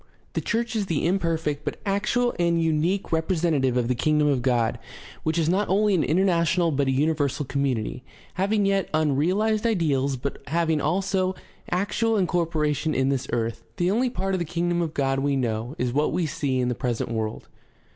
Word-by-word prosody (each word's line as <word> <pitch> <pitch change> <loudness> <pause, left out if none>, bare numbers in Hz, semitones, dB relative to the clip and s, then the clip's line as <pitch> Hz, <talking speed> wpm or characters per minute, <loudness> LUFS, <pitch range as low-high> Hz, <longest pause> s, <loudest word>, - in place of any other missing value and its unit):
The - - -1
church 230 0 -1
is 205 -3 -1
the 165 -3 0
imperfect 165 -5 0
but - - -4
actual 215 +5 +1
and 170 -1 +2
unique 165 +4 0
representa 160 -2 +1
tive 130 -2 +1
of 120 -2 +1
the 125 - +2
Kingdom 150 +4 +2
of 135 -3 +1
God, 120 -3 +1 0.4
which 160 +1 -1
is 165 -2 +1
not 195 +4 +1
only 205 +2 +3
an 175 - +2
international 170 0 +2
but 140 -1 0
a - - +2
universal 145 0 0
community, 130 -3 -2 0.3
having 200 +2 +1
yet 195 -1 +1
unrealized 180 +9 +1
ideals, 140 -10 +1
but 135 +3 -4
having 160 0 +1
also 185 +3 0 0.3
actual 210 +4 +1
incorporation 160 -4 0
in 130 +1 +2
this 135 -2 -1
earth. 115 -1 -2
The 175 +1 +1
only 245 +5 +2
part 195 -4 -2
of 185 - 0
the - - 0
Kingdom 175 +1 -1
of 160 -2 -3
God 135 -1 +1
we 140 0 +1
know 120 0 -2
is 125 -1 -1
what 150 +2 +1
we 175 +1 0
see 135 -3 -1
in 125 - +1
the - - 0
present 120 -2 -2
world. 110 -1 -3
160 Hz, 185 wpm, -25 LUFS, 135-185 Hz, 0.4 s, only